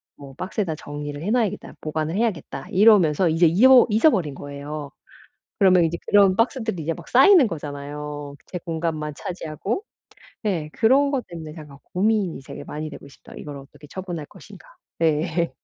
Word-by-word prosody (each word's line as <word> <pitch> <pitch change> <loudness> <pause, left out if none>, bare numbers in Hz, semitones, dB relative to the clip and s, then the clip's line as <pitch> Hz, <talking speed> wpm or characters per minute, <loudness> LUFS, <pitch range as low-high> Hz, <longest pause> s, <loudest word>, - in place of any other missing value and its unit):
뭐 140 -1 -12
박스에다 185 0 -3
정리를 145 0 -7
해 180 - -3
놔야겠다. 230 -5 -1
보관을 155 +1 -3
해야겠다.' 195 -11 -2
이러면서 185 -5 +5
이제 165 +2 +3
입어 245 +10 +7
잊어버린 210 - +3
거예요. 145 +1 -7 0.7
그러면 185 -3 +5
이제 165 +1 -2
그런 200 -2 +5
박스들이 225 - 0
이제 160 +2 -2
막 - - -12
쌓이는 275 - +6
거잖아요 145 -2 -6
제 180 - -5
공간만 160 -3 -3
차지하고. 180 - -4 0.6
네 175 -8 -1
그런 270 +5 +3
것 265 -4 -1
때문에 160 -3 -8
제가 150 -4 -11 0.2
고민이 200 -3 +1
되게 - - -8
많이 155 +1 -6
되고 145 - -11
있습니다. 140 - -15
'이걸 145 -1 -8
어떻게 140 +2 -14
처분할 175 -2 -6
것인가.' - - -15 0.3
네. 165 0 +1
165 Hz, 375 characters per minute, -23 LUFS, 150-205 Hz, 0.7 s, 입어